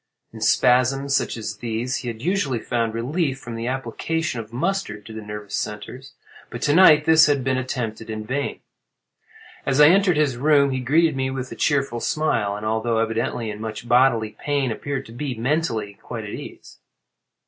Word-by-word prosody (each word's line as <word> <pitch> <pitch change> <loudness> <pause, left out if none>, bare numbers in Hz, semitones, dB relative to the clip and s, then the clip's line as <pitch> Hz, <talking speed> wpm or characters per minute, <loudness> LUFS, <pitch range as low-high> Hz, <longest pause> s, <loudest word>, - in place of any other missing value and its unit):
In 110 - -10
spasms 130 +4 +3
such 135 - 0
as 105 -2 -5
these 120 +3 -2
he 125 - -6
had 115 0 -6
usually 165 -8 0
found 115 -1 -2
relief 135 +4 -1
from 120 -3 -8
the 115 +1 -4
application 135 +3 -2
of 110 -1 -8
mustard 130 - -2
to 110 - -10
the 110 - -6
nervous 105 -1 -8
centres, 125 +6 -6 0.4
but 120 - -6
to 145 - +3
night 155 -4 +7
this 160 0 +6
had 140 -3 +1
been 130 0 +1
attempted 115 -4 -4
in 110 -1 -5
vain. 140 +5 -3 1.0
As 135 +1 0
I 150 +1 +9
entered 185 -2 +4
his 145 -5 +1
room 140 0 +4
he 130 - -1
greeted 155 +5 +2
me 130 0 -1
with 130 -1 -5
a - - -6
cheerful 140 -5 0
smile, 115 -9 0
and 105 +1 -6
although 110 +1 0
evidently 115 0 -1
in 105 0 -8
much 110 +1 -6
bodily 120 -3 +3
pain, 140 -4 0
appeared 140 +4 -4
to - - -13
be, 130 +2 -4
mentally, 115 -5 -1
quite 115 -2 -6
at 105 - -7
ease. - - -10
125 Hz, 185 wpm, -23 LUFS, 115-145 Hz, 1.0 s, I